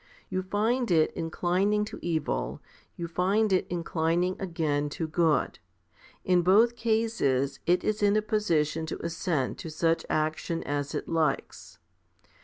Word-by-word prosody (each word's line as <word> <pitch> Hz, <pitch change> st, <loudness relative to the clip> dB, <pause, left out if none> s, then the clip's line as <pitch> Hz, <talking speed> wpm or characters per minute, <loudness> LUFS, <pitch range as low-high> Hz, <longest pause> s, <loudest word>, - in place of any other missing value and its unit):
You 185 Hz, -, -1 dB
find 220 Hz, +6 st, 0 dB
it 160 Hz, -3 st, +3 dB
inclining 185 Hz, +6 st, 0 dB
to -, -, -8 dB
evil, 155 Hz, -, -2 dB, 0.4 s
you 170 Hz, -, -4 dB
find 195 Hz, +5 st, +1 dB
it 185 Hz, -, +1 dB
inclining 170 Hz, +1 st, 0 dB
again 155 Hz, -5 st, -1 dB
to 165 Hz, -, -1 dB
good. 160 Hz, -3 st, +1 dB, 0.7 s
In 180 Hz, -1 st, +4 dB
both 215 Hz, +7 st, +4 dB
cases 220 Hz, -, 0 dB
it 175 Hz, +1 st, +3 dB
is 215 Hz, 0 st, -1 dB
in 205 Hz, 0 st, +4 dB
a 215 Hz, -, +1 dB
position 165 Hz, -7 st, 0 dB
to -, -, -5 dB
assent 165 Hz, -5 st, -2 dB
to 165 Hz, -, -6 dB
such 165 Hz, +1 st, +1 dB
action 155 Hz, +2 st, -1 dB
as 145 Hz, 0 st, -3 dB
it -, -, -3 dB
likes. 160 Hz, -4 st, -2 dB
170 Hz, 140 wpm, -28 LUFS, 155-205 Hz, 0.7 s, In